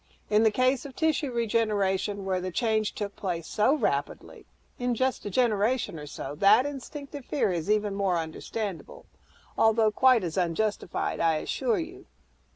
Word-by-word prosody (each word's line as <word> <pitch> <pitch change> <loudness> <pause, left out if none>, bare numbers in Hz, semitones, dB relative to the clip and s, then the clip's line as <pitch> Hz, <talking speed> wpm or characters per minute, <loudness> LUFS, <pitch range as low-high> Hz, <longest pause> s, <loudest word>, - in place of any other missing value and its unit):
In 210 +1 +5
the 220 - +5
case 255 +3 +1
of 275 -2 -10
tissue 315 -3 0
regeneration, 205 -4 0
where 185 -1 0
the 185 - -3
change 220 +2 0
took 205 -1 -4
place 175 -4 -3
so 215 - +2
rapidly, - - -3 0.3
in 245 -1 0
just 260 -2 -1
a - - -2
generation 220 -3 +1
or 150 - -8
so, 140 -1 -6
that 200 +6 +6
instinctive 285 0 -7
fear 260 -6 0
is 175 +1 -3
even 210 -1 +1
more 195 -3 +1
understandable 170 +4 -5 0.5
although 220 -1 +4
quite 255 -2 +4
as 170 +1 -4
unjustified, 185 +2 -1
I 165 -1 +3
assure 440 - -1
you." 360 +3 -7
215 Hz, 160 wpm, -27 LUFS, 190-255 Hz, 0.5 s, that